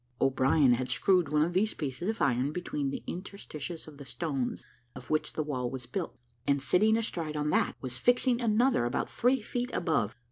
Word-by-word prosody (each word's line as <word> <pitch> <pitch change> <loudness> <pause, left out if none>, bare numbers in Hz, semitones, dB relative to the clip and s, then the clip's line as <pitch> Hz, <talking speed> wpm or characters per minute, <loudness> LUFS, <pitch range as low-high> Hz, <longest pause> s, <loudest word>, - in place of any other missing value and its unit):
O'Brien 135 0 +4
had 125 +1 -1
screwed 180 -6 +2
one 150 0 +3
of 170 +2 -1
these 210 +4 +1
pieces 140 +6 -3
of 220 - -1
iron 130 +1 +2
between 150 -4 -2
the - - -5
interstices 175 -4 -6
of 150 -2 -12
the - - -7
stones 135 -1 -3 0.3
of 125 -1 -9
which 155 - 0
the 155 - -1
wall 130 -5 -2
was 130 -1 -5
built, 120 - -4 0.3
and 140 0 +3
sitting 180 - +3
astride 165 -9 -2
on 150 0 0
that, - - +2
was 130 -2 -5
fixing 245 0 +3
another 235 - +3
about 120 - -2
three 250 -1 +2
feet 245 +3 -2
above. 155 - 0
150 Hz, 190 wpm, -30 LUFS, 130-200 Hz, 0.3 s, O'Brien